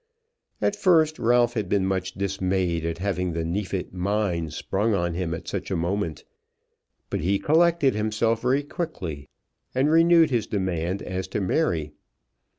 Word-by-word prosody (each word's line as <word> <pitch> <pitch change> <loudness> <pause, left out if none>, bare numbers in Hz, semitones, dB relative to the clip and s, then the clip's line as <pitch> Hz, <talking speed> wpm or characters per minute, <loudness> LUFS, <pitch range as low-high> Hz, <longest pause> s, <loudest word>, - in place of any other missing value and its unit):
At 205 - +2
first 160 -6 +3
Ralph 120 0 +3
had 105 -5 -2
been 100 -2 +2
much 95 -1 -1
dismayed 95 -4 -1
at 85 - -3
having 90 -2 -1
the 80 0 -2
Neefit 95 +2 -3
mine 90 -3 -1
sprung 100 +7 -1
on 85 -2 -1
him 85 -1 -2
at 80 - -10
such - - -4
a - - -1
moment; 85 -1 -2 0.9
but - - -1
he 95 +5 +1
collected 160 - +3
himself 110 +2 0
very 130 +3 +1
quickly, 90 - -5 0.5
and 135 +4 +3
renewed 165 -1 +5
his 115 -4 0
demand 95 -2 -2
as 95 0 -4
to 100 - -3
Mary. 90 - 0
100 Hz, 155 wpm, -25 LUFS, 90-120 Hz, 0.9 s, renewed